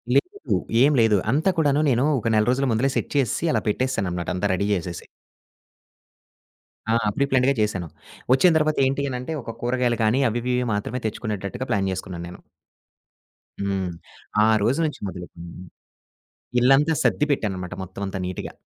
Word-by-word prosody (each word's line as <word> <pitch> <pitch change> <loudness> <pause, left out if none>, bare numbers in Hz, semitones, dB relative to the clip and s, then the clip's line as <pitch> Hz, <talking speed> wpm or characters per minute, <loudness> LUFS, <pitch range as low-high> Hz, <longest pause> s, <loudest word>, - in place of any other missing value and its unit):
లేదు, 405 +3 0 0.3
ఏం 145 - +5
లేదు. 110 -2 +4
అంతా 155 +8 +2
కూడాను 145 -2 +3
నేను 125 +1 +2
ఒక 115 - -3
నెల 105 0 +3
రోజుల 135 +2 +1
ముందులే 125 +5 +1
సెట్ - - -2
చేసేసి 140 +3 +1
అలా - - +1
పెట్టేసాననమాట. 100 -8 -1
అంతా 90 - 0
రెడీ 100 +2 0
చేసేసి. 90 -2 -4 1.8
ఆ! - - +3 0.2
ప్రీ 140 - +2
ప్లాన్డ్‌గా 130 +1 +3
చేసాను. 95 -5 -1 0.5
ఒచ్చిన 170 +7 +5
తర్వాత 155 0 +1
ఏంటి 135 +1 0
అనంటే, 125 +4 -4
ఒక 115 -1 -7
కూరగాయలు 120 -1 0
కానీ, 115 +5 +3
అవి 115 +2 -2
ఇవి 125 - -1
ఇవి 125 0 0
మాత్రమే 110 +5 -3
తెచ్చుకునేటట్టుగా 110 +3 -4
ప్లాన్ 95 -2 +1
చేసుకున్నా 95 -1 -6
నేను. 90 - -11 1.2
హ్మ్. 95 -2 -1 0.6
ఆ - - +4 0.2
రోజు 125 +8 +1
నుంచి 150 - -4
మొదలుకుని 90 -2 -9 1.1
ఇల్లంతా 135 +5 +4
సర్ది 150 - +2
పెట్టాననమాట 95 -8 -2
మొత్తం 95 +2 -9
అంతా 95 0 -4
నీట్‌గా. 90 - -5
120 Hz, 150 wpm, -23 LUFS, 95-135 Hz, 1.8 s, ఏం